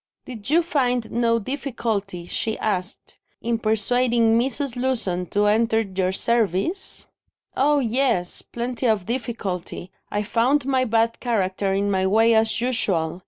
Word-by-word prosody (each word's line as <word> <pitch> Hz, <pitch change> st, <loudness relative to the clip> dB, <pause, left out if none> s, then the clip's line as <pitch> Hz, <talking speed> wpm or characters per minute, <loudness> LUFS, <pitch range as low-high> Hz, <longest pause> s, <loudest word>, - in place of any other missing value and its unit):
"Did 230 Hz, -4 st, -7 dB
you 335 Hz, +3 st, +4 dB
find 250 Hz, -8 st, 0 dB
no 230 Hz, 0 st, +2 dB
difficulty," 225 Hz, -7 st, -3 dB
she 220 Hz, +5 st, -2 dB
asked, 195 Hz, -2 st, -4 dB, 0.2 s
"in 230 Hz, -1 st, -1 dB
persuading 230 Hz, +1 st, +2 dB
Mrs. 265 Hz, +2 st, 0 dB
Lewson 225 Hz, -9 st, 0 dB
to 205 Hz, +5 st, +1 dB
enter 225 Hz, +2 st, +3 dB
your 190 Hz, -3 st, -1 dB
service?" 235 Hz, -, 0 dB, 0.5 s
"Oh, 290 Hz, +2 st, +3 dB
yes, 240 Hz, -7 st, 0 dB
plenty 240 Hz, +1 st, -3 dB
of 215 Hz, -5 st, +1 dB
difficulty; 200 Hz, -7 st, -4 dB, 0.2 s
I 205 Hz, 0 st, -1 dB
found 250 Hz, +6 st, +1 dB
my 260 Hz, -1 st, +1 dB
bad 230 Hz, 0 st, +1 dB
character 195 Hz, -4 st, -1 dB
in 200 Hz, +1 st, 0 dB
my 190 Hz, -1 st, +1 dB
way, 225 Hz, +4 st, +4 dB
as 220 Hz, -1 st, +2 dB
usual." 190 Hz, -9 st, 0 dB
225 Hz, 135 wpm, -23 LUFS, 200-250 Hz, 0.5 s, you